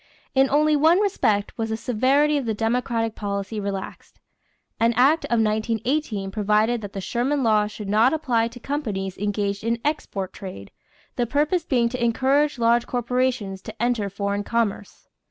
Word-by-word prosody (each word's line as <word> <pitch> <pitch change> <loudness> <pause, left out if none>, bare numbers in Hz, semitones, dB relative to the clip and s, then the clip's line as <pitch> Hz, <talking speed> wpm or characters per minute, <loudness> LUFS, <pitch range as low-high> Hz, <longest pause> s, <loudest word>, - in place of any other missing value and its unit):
In 270 0 +4
only 300 +1 +3
one 320 +5 +4
respect 220 - 0
was 225 0 -1
the 220 - -2
severity 265 +6 +2
of 275 -5 -1
the 220 - 0
Democratic 225 0 -1
policy 200 +1 -4
relaxed. 200 -1 -6 0.6
An 230 +1 +3
act 275 +7 +3
of 235 - 0
1918 220 0 -1
provided 215 +3 +1
that 205 -2 -8
the 195 - -4
Sherman 260 +7 -1
law 215 -2 +3
should 210 -1 -8
not 220 +5 +4
apply 250 -8 +1
to 235 +1 -11
companies 210 -9 -3
engaged 205 0 -2
in 230 +1 0
export 205 -11 -2
trade, 185 - -9 0.5
the 240 - 0
purpose 300 +6 +1
being 240 -3 +2
to 250 0 -3
encourage 270 +5 +2
large 235 0 +2
corporations 245 -5 -1
to 220 +2 -10
enter 235 -4 0
foreign 200 +1 -2
commerce. 210 -3 -2
230 Hz, 160 wpm, -23 LUFS, 205-260 Hz, 0.6 s, In